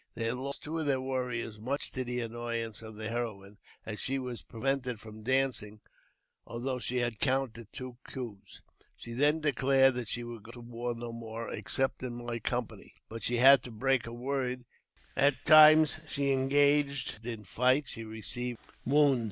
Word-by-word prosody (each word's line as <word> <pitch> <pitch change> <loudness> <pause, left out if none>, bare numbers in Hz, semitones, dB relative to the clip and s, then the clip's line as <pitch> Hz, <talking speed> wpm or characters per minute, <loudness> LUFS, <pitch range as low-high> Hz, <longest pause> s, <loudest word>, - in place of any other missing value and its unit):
They 115 - -2
had 115 +2 0
lost 140 +2 -5
two 160 +2 -3
of 155 - -2
their 135 -2 +2
warriors, 125 -4 -3
much 135 +6 -2
to 130 - -2
the 125 0 -2
annoyance 115 -1 -4
of 110 -1 -10
the 110 0 -5
heroine, 105 -4 -5 0.3
as 110 -1 -5
she 135 - -2
w; 125 -2 -3
prevented 125 -1 -1
from 110 0 -11
dancing, 125 -4 0 0.6
although 125 +2 -4
she 125 +1 -1
had 120 -3 -1
counted 130 -5 -1
two 130 -2 -7
coo^ 120 -7 -6 0.6
She 115 - -9
then 145 +5 +3
declared 135 -2 +4
that 125 -2 -3
she 120 +3 -3
would 120 -2 -8
go 110 - -12
to 120 - -10
war 120 0 -4
no 120 0 -6
more, 115 0 -6
except 130 +6 0
my 120 -1 -4
company; 120 +1 -4
but 115 +1 -7
she 120 - 0
had 135 +1 +8
to 125 - -9
break 130 +2 +1
her 115 - -7
word, 125 0 -3 0.5
and 140 -1 +4
the - - -21
next 140 - -26
time 155 0 +9 0.2
she 140 -2 0
engaged 140 -2 +2
in 115 -2 -5
fight 125 +7 +2
she 115 - -6
received 115 +2 -4
a - - -29
severe - - -25 0.2
wound. 140 -4 +5
125 Hz, 185 wpm, -31 LUFS, 115-135 Hz, 0.6 s, time